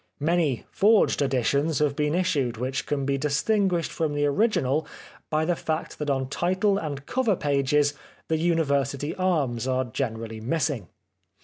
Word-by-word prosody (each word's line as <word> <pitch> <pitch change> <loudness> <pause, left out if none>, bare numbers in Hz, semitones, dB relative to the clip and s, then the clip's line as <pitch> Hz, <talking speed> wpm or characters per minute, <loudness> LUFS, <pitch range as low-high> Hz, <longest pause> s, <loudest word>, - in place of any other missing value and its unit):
Many 155 -4 +1
forged 210 -5 +3
editions 140 +3 +1
have 145 -1 +1
been 150 +1 0
issued 150 -11 0
which 130 +3 -3
can 140 -2 -1
be 140 0 0
distinguished 175 +5 +1
from 155 -3 -1
the 145 0 +1
original 150 - +1 0.4
by 155 0 +1
the 175 +1 +1
fact 160 0 -4
that 150 -1 -2
on 135 -1 0
title 185 +7 +1
and 145 -3 -5
cover 240 -6 +1
pages 145 -1 +1 0.3
the 160 - +1
University 145 -3 0
Arms 145 -10 0
are 130 0 +1
generally 115 -2 -4
missing. 135 - -1
145 Hz, 145 wpm, -25 LUFS, 135-165 Hz, 0.4 s, forged